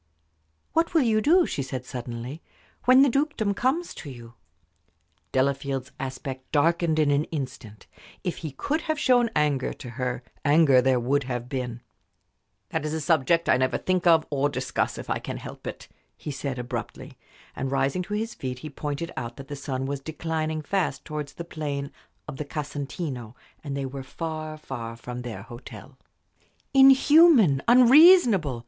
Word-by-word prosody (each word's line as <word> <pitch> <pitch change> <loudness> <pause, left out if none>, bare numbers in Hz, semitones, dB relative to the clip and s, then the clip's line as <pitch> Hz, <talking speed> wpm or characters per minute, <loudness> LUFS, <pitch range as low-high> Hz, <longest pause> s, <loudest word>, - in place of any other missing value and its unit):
"What 330 +1 +1
will 315 - +5
you 220 -2 +2
do," 340 +7 +5
she - - -3
said, 130 -1 -5
suddenly, 125 +3 -6 0.4
"when 255 +2 +7
the - - +5
dukedom 275 -6 0
comes 275 - -1
to 145 - -9
you?" 120 -3 -11 1.0
Delafield's 135 -1 -1
aspect 130 0 -6
darkened 165 +1 +2
in 150 -2 +3
an 145 +2 +2
instant. 130 -8 -7 0.4
If 180 -3 -3
he 160 - -5
could 285 - -2
have 315 -2 -2
shown 245 -5 +3
anger 145 -3 +1
to 125 - -10
her, 125 0 -3 0.2
anger 145 -3 +5
there 130 0 +2
would 135 +3 0
have 125 -2 -4
been. 125 -3 -4 0.9
"That - - -2
is 155 +1 -2
a - - -2
subject 160 +1 +2
I - - +5
never 130 0 +1
think 185 -1 0
of 165 -2 +5
or 145 0 +1
discuss, 130 -2 -2
if - - -7
I - - -1
can - - -6
help - - -9
it," - - -7 0.3
he 150 - -6
said, 135 -1 -4
abruptly; 125 0 -6 0.4
and, 135 - -3
rising 135 +5 0
to 210 +3 -4
his 225 +2 -3
feet, 130 -1 -5
he 155 - -6
pointed 150 +3 -4
out 120 -2 -5
that 135 -1 -10
the 145 - -4
sun 135 -2 -4
was 140 0 -3
declining 160 +1 -3
fast 190 +4 -1
towards 150 -2 -5
the 170 - -7
plain 145 -4 -4 0.4
of 150 -3 -7
the 150 - -4
Casentino, 140 -4 -5 0.3
and 140 -2 -4
they 140 - -2
were 135 +1 -6
far 155 +2 -5
from 125 -3 -7
their 115 -5 -7
hotel. 120 +1 -12 0.7
"Inhuman! 270 - +6
unreasonable!" 245 - +6
145 Hz, 165 wpm, -26 LUFS, 130-175 Hz, 1.0 s, when